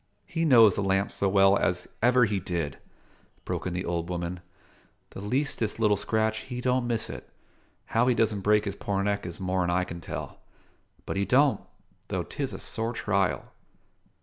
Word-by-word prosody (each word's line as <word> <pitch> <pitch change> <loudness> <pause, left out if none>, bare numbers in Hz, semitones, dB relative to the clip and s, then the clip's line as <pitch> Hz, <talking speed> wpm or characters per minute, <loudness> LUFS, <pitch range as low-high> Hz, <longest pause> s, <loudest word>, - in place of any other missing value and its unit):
"He 165 -1 -1
knows 115 - +7
the 105 - -2
lamp 95 0 +1
so 100 - 0
well 95 0 +5
as 90 -3 0
ever 125 +1 +5
he 105 -2 -1
did," 85 -6 -3 0.7
broke - - -3
in 90 - -3
the 90 +2 -3
old 85 0 -2
woman; 90 0 -3 0.7
"the - - -8
leastest 115 -1 -1
little 105 -2 +4
scratch, 110 +2 0
he 125 -1 -6
don't 125 0 +1
miss 115 -2 -1
it. - - -8 0.6
How 115 +2 +1
he 125 - +3
doesn' 110 -3 +1
break 105 +2 +3
his 100 -1 -3
poor 100 -1 -2
neck 100 -2 -1
is 85 -1 -8
more'n 90 -1 0
I 90 +1 +2
can 85 -1 -7
tell; - - -6 0.7
but - - -3
he 100 - +1
don't 140 +4 +3 0.5
though - - -2
'tis - - -4
a - - -6
sore 115 +1 -2
trial." 100 -4 0
100 Hz, 180 wpm, -27 LUFS, 90-115 Hz, 0.7 s, knows